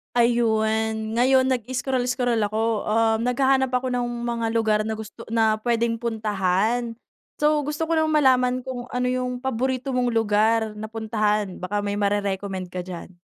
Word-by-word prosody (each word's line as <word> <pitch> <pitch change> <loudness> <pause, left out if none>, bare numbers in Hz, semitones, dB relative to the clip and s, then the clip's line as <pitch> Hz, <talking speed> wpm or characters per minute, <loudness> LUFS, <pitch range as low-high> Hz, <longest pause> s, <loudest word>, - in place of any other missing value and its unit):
Ayun, 220 -2 +1
ngayon 260 +2 +4
nag-scroll 250 +1 -1
scroll 245 -2 0
ako, 220 +1 -1
um, 225 0 +2
naghahanap 265 +1 +2
ako 250 0 0
ng 245 -1 -1 0.2
mga 235 -1 -1
lugar 220 -2 +2
na 220 - -2
gusto 220 +1 -10
na 220 -1 +2
puwedeng 230 0 0
puntahan. 220 +1 0 0.4
So 300 0 +2
gusto 300 +3 -2
ko 330 - -1
lang 315 0 +2
malaman 255 -4 +3
kung 250 -2 -5
ano 250 0 -1
'yung 250 0 -2
paborito 260 +1 -1
mong 250 -1 +1
lugar 220 0 +2
na 215 +1 -7
puntahan 215 -3 -1
baka 205 +3 -2
may 200 - -1
mare-recommend 200 -2 -2
ka 180 - -3
diyan. 180 0 -9
230 Hz, 155 wpm, -24 LUFS, 215-250 Hz, 0.4 s, ngayon